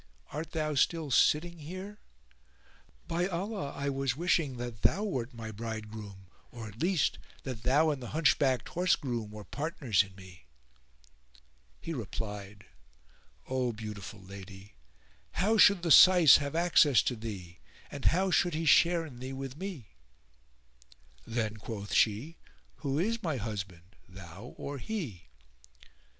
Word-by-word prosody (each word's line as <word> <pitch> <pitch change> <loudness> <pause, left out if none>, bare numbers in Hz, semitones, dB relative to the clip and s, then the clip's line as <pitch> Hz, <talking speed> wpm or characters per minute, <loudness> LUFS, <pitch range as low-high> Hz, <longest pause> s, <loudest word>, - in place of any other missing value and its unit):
Art 155 +2 -5
thou 155 -2 -1
still 155 +1 +1
sitting 170 +6 +3
here? 185 +7 -8 1.1
By 175 +2 0
Allah 190 -3 -3
I 140 0 -2
was 135 -2 -1
wishing 160 -6 +1
that 120 -2 -6
thou 200 +5 +2
wert 130 - -2
my 115 -2 -7
bridegroom 110 -3 -7 0.3
or, 115 -2 -8
at 105 +2 -12
least, 175 -3 +1 0.2
that 125 -4 -5
thou 145 +6 +3
and 140 -3 -4
the 120 - -6
hunchbacked 135 -5 +2
horse 180 +1 +2
groom 120 -6 -4
were 105 0 -9
partners 145 - 0
in 95 -1 -7
me." 90 -7 -14 1.3
He 165 - -5
replied, 105 -4 -6 0.8
"O 130 -2 -1
beautiful 105 -2 -7
lady, 95 +1 -11 0.6
how 215 +4 +2
should 200 -4 +6
the 170 - 0
Syce 175 -2 +9
have 140 +1 -4
access 165 -6 +5
to 125 - -1
thee, 100 -6 -8 0.3
and 140 - -7
how 190 +2 +3
should 175 -2 +2
he 165 +1 -2
share 170 +2 +5
in 130 -6 -11
thee 130 +1 -6
with 135 -1 -6
me?" 165 - -7 1.4
"Then," 110 -2 -2
quoth 100 -1 -6
she, 115 +10 +1 0.4
"who 140 0 -2
is 225 +7 0
my 160 -8 -1
husband, 100 -5 -6
thou 95 +4 -11
or 140 -1 -5
he?" 135 - -5
130 Hz, 140 wpm, -30 LUFS, 105-165 Hz, 1.4 s, Syce